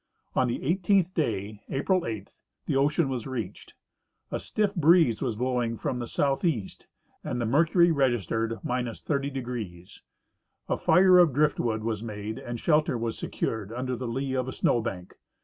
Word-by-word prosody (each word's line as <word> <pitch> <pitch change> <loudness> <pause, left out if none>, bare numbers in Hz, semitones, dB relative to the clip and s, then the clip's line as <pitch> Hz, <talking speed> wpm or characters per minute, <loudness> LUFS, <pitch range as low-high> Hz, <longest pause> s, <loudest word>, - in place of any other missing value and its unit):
On 130 - +3
the 120 - -3
eighteenth 185 +3 +2
day, 105 - -2
April 180 +6 0
8, 110 -3 -5 0.3
the - - -1
ocean 145 +3 +2
was 130 -3 -3
reached. 115 -7 -6 0.6
A - - -2
stiff 210 -2 -1
breeze 165 - +4
was 120 -5 -1
blowing 120 -1 -1
from 125 - -2
the 120 - -4
southeast 135 - -1 0.4
and 125 - -3
the 120 - 0
mercury 165 - +4
registered 115 - +1
— 115 - -6
30°. 125 - -3 0.7
A - - +1
fire 185 -1 +6
of 170 -6 +5
driftwood 120 -6 +1
was 110 -2 -2
made 110 -1 -5
and 120 -1 -6
shelter 150 -4 +2
was 115 -1 -2
secured 110 -2 -3
under 125 +2 -3
the 125 0 -5
lee 130 +3 -2
of 130 -1 -1
a - - -3
snow 120 - +2
bank. 95 -6 -6
125 Hz, 160 wpm, -27 LUFS, 115-150 Hz, 0.7 s, fire